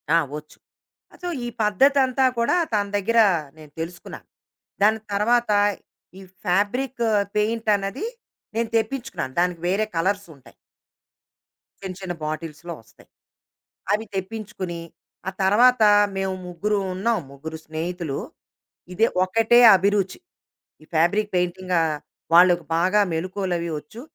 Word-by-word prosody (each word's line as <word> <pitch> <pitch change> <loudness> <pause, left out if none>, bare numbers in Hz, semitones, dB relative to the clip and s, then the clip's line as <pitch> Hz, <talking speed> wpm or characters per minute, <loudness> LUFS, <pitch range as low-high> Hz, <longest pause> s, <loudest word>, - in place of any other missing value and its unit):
ఆ! - - +7 0.2
ఒచ్చు. 150 0 -13 0.6
ఆ - - -14
సో, 355 - -3 0.2
ఈ - - -3 0.2
పద్ధతంతా 265 +5 +3
కూడా 235 +8 +2 0.2
తన 205 -1 +2
దగ్గర 230 +4 +2 0.4
నేను 155 -2 -14
తెలుసుకున్నాను. 170 +1 -7 0.6
దాని 220 +1 +4
తర్వాత, 235 +3 +2 0.7
ఈ - - -11 0.2
ఫ్యాబ్రిక్ 235 +7 0 0.3
పెయింటన్నది, 210 - 0 0.5
నేను 230 0 0
తెప్పించుకున్నాను. 225 - -3
దానికి 175 -1 0
వేరే 200 +4 +1
కలర్సుంటాయి. 165 - -3 1.3
చిన్న, 185 -1 -5
చిన్న 185 -2 -4
బాటిల్స్‌లో 155 +2 -5
ఒస్తాయి. 110 0 -22 0.9
అవి 215 +2 -1
తెప్పించుకొని, 190 -3 -5 0.5
ఆ - - -6
తర్వాత 230 +4 +5 0.3
మేము 190 0 -1
ముగ్గురుంన్నాం. 195 +4 -1
ముగ్గురు 160 +4 -8
స్నేహితులు. 160 -2 -4 0.8
ఇది 220 +5 +3 0.2
ఒకటే 225 +5 +4 0.2
అభిరుచి. 195 0 +1 0.6
ఈ - - -15
ఫ్యాబ్రిక్ 200 +6 +2
పెయింటింగా 180 0 0 0.5
వాళ్ళుకి 175 -1 +6
బాగా 185 +5 +3
మెలుకోలవి 180 0 -2
ఒచ్చు. 150 +10 -12
190 Hz, 105 wpm, -23 LUFS, 175-220 Hz, 1.3 s, ఆ